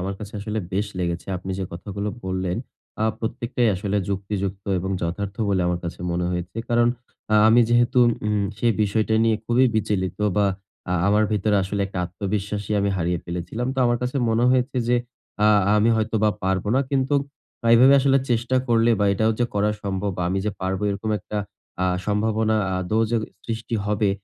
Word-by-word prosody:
আমার 95 +2 -3
কাছে 105 -1 -8
আসলে 105 +1 -3
বেশ 100 +2 0
লেগেছে। 85 -1 -2
আপনি 95 +1 -7
যে 95 - -2
কথাগুলো 100 +4 -5 0.2
বললেন, 95 0 -2 0.5
আ - - +3
প্রত্যেকটাই 120 +1 -1
আসলে 100 +2 -2
যুক্তিযুক্ত 100 0 -3
এবং 95 +2 -3
যথার্থ 95 +4 -3
বলে 95 -2 +2
আমার 90 0 0
কাছে 85 - -6
মনে 85 0 -1
হয়েছে। 90 +3 -4
কারণ, 120 0 +3 0.4
আ - - +5
আমি 120 +2 +6
যেহেতু 120 +1 +3 0.3
উম 105 -1 +1
সেই 115 0 +2
বিষয়টা 110 +1 +1
নিয়ে 110 -1 +3
খুবই 125 +2 +4
বিচলিত 100 -3 -1 0.2
বা 105 - +4 0.4
আ - - +1
আমার 105 +1 +4
ভেতরে 105 0 +2
আসলে 100 +2 -3
একটা 95 -1 -6
আত্মবিশ্বাসই 100 +3 -3
আমি 100 - +1
হারিয়ে 90 -1 0
ফেলেছিলাম। 90 +8 -4
তো - - -5
আমার 120 - +2
কাছে 125 +3 -2
মনে 115 +2 +2
হয়েছে 130 +1 +1
যে, 125 - +4 0.5
আ - - +6 0.3
আমি 105 +2 +3
হয়তোবা 110 -1 +1
পারব 95 0 0
না। 135 - +4
কিন্তু 135 0 +1 0.6
এভাবে 130 +4 +7
আসলে 135 0 +4
চেষ্টা 120 +2 +1
করলে 115 0 +4
বা 105 - +3
এটাও 110 +3 +2
যে 120 - +3
করা 105 +1 +2
সম্ভব 100 0 -2
বা - - 0
আমি 95 - 0
যে 105 - 0
পারবো, 95 +1 -2
এরকম 100 +2 -3
একটা 105 +3 -5 0.4
আ 95 - +2 0.2
সম্ভাবনা 110 +1 +1 0.2
আদৌ 100 +5 0
যে 120 - +2 0.3
সৃষ্টি 115 +1 -4
হবে, 105 -1 +1
105 Hz, 180 wpm, -23 LUFS, 95-115 Hz, 0.6 s, এভাবে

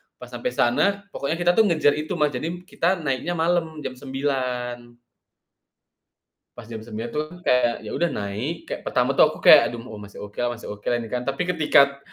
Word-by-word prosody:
Pas - - -12
sampai - - -3
sana, 200 0 +2
pokoknya 140 +3 -2
kita 175 0 +3
tuh 220 - +6
ngejar 155 -5 +3
itu 155 - -4
Mas, 150 -1 +2
jadi 130 +3 -4
m 175 - -9
kita 180 0 0
naiknya 135 +5 -1
malam 165 -2 0
jam - - -3
09:00. 125 -3 -3 1.6
Pas - - -9
jam 110 - -5
9:00 115 +1 -6
tuh 150 - -1
kan 175 +3 -13
kayak 120 -2 +3
ya - - -7
udah 175 - +1
naik, 105 +12 -4
kayak - - -6
pertama - - +2
tuh - - +6
aku - - -8
kayak, - - +9
"Aduh, 120 - -6
m 125 - -11
oh, 105 - -8
masih 100 0 -10
oke 105 0 -10
lah 120 0 0
masih 115 - -8
oke 105 0 -10
lah 120 - +2
ini 115 - -10
kan." 125 +1 -3
Tapi 140 +6 -1
ketika 140 -4 +4
135 Hz, 215 wpm, -24 LUFS, 120-160 Hz, 1.6 s, kayak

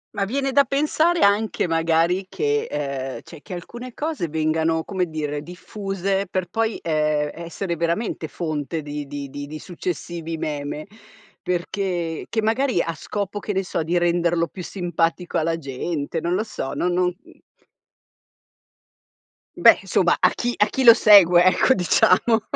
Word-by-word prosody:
Ma 200 - 0
viene 270 +5 -1
da 280 +1 +5
pensare 310 +5 +1
anche 205 0 +2
magari 165 +3 +1
che 440 0 0
ehm, 140 -2 -4
cioè, 165 -3 -13
che 185 - -9
alcune 240 +8 -9
cose 300 - -2
vengano, 160 +1 0
come 185 -2 -2
dire, 150 -2 -4
diffuse 195 +3 -3
per 185 -1 -2
poi, 225 0 0
ehm, 150 -2 0
essere 170 +2 -4
veramente 170 +1 -2
fonte 155 -1 -4
di 145 -1 -6
di 145 0 -6
di 145 +3 -7
successivi 170 -1 -5
meme, 150 0 -4 0.6
perché 175 -2 -3
che 225 - 0
magari 240 -1 +1
a 165 0 -1
scopo, 205 +5 -4
che 205 - -4
ne 190 0 0
so, 180 - -2
di 170 +3 0
renderlo 170 -1 +1
più 185 - -9
simpatico 175 -1 -1
alla 165 +1 0
gente, 145 +2 -4
non 175 +1 0
lo 215 - 0
so, 175 -10 -5
non 180 0 0
non 180 0 +2 0.2
mhmm - - -19 2.2
Beh - - +7
insomma - - +2
a - - +5
chi 245 0 -2
a 210 - +5
chi 265 +5 -2
lo 235 -2 +10
segue 180 -6 +7
ecco 185 +7 +4
diciamo, 185 +5 +3
175 Hz, 150 wpm, -22 LUFS, 160-205 Hz, 2.2 s, lo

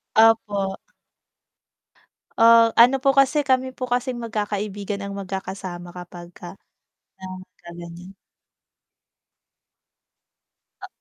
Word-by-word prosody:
Opo. 210 -3 +3 1.6
Oh, 230 0 +6
ano 255 +3 +6
po 270 +1 +2
kasi 275 +2 +3
kami 260 -1 0
po 255 - -3
kasing 250 0 -2
magkakaibigan 205 -3 -4
ang 200 - -6
magkakasama 190 -2 -6
kapagka 175 0 -11 0.6
yan, 185 -1 -9
'pagka 185 -2 -16
ganiyan. 175 +3 -11 2.7
Ah - - -8
205 Hz, 85 wpm, -22 LUFS, 185-240 Hz, 2.7 s, Oh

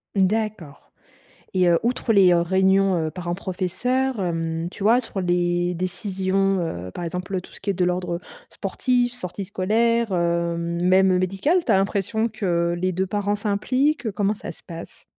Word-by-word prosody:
D'accord 195 -6 -1 0.6
et 185 -1 +3
heu, 170 -1 +5
outre 240 -1 0
les, 190 -3 +6
heu, 170 - +4
réunions, 190 +2 +3
heu, - - -4
parents 175 -1 -4
professeurs 205 +7 -1
hem, 165 -1 -2
tu 200 - -7
vois, 235 +4 +5
sur 210 -4 -6
les 175 0 +1
décisions, 190 +1 0
heu, 90 - -4
par 175 - -6
exemple, 180 +2 -3
tout - - -16
ce - - -12
qui 200 - -4
est - - -2
de 180 0 0
l'ordre 180 -1 -1 0.3
sportif, 245 -1 0
sorties 195 -4 -6
scolaires, 220 +3 +1
heu, 170 -1 +1
même 180 +2 +3
médical, 195 - +1
tu - - +1
as - - +5
l'impression 200 +4 0
que 175 -6 0
les 185 0 0
2 190 +2 0
parents 205 +1 -1
s'impliquent? 255 +8 0
Heu, 220 - 0
comment 205 0 +1
ça - - -7
se - - -14
passe? 165 -2 -10
190 Hz, 175 wpm, -23 LUFS, 175-210 Hz, 0.6 s, les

